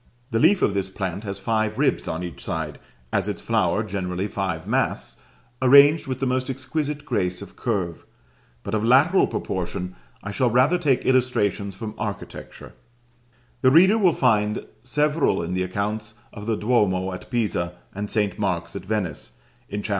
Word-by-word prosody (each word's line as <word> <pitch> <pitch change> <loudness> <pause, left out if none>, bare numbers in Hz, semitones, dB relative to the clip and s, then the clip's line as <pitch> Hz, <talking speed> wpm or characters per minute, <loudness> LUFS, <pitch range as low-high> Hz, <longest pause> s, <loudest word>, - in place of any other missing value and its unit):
The 115 - +1
leaf 185 - +4
of 100 - +3
this 100 -1 -1
plant 95 0 -4
has 100 -1 -4
five 110 -1 -1
ribs 145 +1 +1
on 80 +3 -3
each 85 - -7
side, - - -4 0.3
as - - +1
its - - -3
flower - - +1
generally 90 -1 -3
five 95 -2 -3
masts, - - -1 0.4
arranged 140 +4 +7
with 130 -1 -3
the 135 - 0
most 130 0 0
exquisite 145 +3 -3
grace 90 - -1
of 100 - -14
curve; 95 -8 -2 0.6
but 100 - -5
of 110 -1 +1
lateral 140 +11 +5
proportion 90 0 -4 0.3
I 100 - -4
shall 125 +4 +1
rather 130 +9 +3
take 140 -7 +1
illustrations 105 -6 +1
from 105 +2 -6
architecture: 105 -2 -7 0.9
the 130 - +6
reader 190 +10 +6
will 185 -4 +5
find 105 -6 +1 0.2
several 150 - +1
in 85 +2 -3
the 90 - 0
accounts 105 +3 -3 0.2
of 105 0 -8
the 115 - +1
Duomo 100 -5 +1
at 90 - -9
Pisa 90 -8 -1 0.2
and 105 +1 -4
St. 105 -2 0
Mark's 85 -4 -2
at 100 - -5
Venice, 95 -7 -3 0.3
in 105 0 -4
Chap. - - -4
105 Hz, 170 wpm, -24 LUFS, 95-130 Hz, 0.9 s, arranged